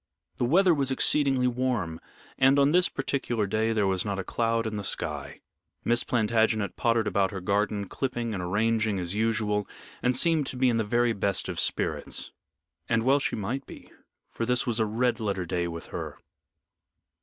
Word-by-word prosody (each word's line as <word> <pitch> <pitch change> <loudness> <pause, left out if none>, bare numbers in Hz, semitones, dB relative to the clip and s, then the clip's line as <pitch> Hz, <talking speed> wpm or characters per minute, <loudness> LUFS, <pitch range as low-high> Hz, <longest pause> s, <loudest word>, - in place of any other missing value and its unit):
The - - +1
weather 180 +7 +4
was 140 -3 0
exceedingly 135 -1 +2
warm, 120 -10 -1 0.4
and 135 +1 +5
on 140 +1 +4
this 180 +2 +4
particular 130 -5 -2
day 110 +3 0
there 105 -2 +1
was 95 -1 +1
not 100 -2 -3
a 95 - -3
cloud 115 +3 0
in 110 -1 -3
the 100 - -4
sky. - - -4 0.4
Miss 120 +1 +2
Plantagenet 110 -3 +1
pottered 115 -1 +1
about 100 -2 +1
her 95 - -5
garden, 100 +2 0
clipping 120 -2 -3
and 95 - -3
arranging 110 +3 +1
as 90 -1 -3
usual, 105 -2 0 0.3
and 125 0 +2
seemed 160 -2 +2
to - - -6
be 130 0 +3
in 115 - +1
the 110 - +1
very 120 +2 +1
best 100 -2 -1
of 90 -3 -4
spirits. - - -1 0.6
And 115 -1 +2
well 135 +3 +4
she - - -1
might 115 +6 -4
be, - - -12 0.4
for - - -4
this 125 +1 +2
was 120 -2 -1
a 110 - +2
red 120 +3 0
letter 100 -4 -2
day 85 0 -1
with 85 -1 -7
her. - - -5
115 Hz, 185 wpm, -27 LUFS, 100-125 Hz, 0.6 s, and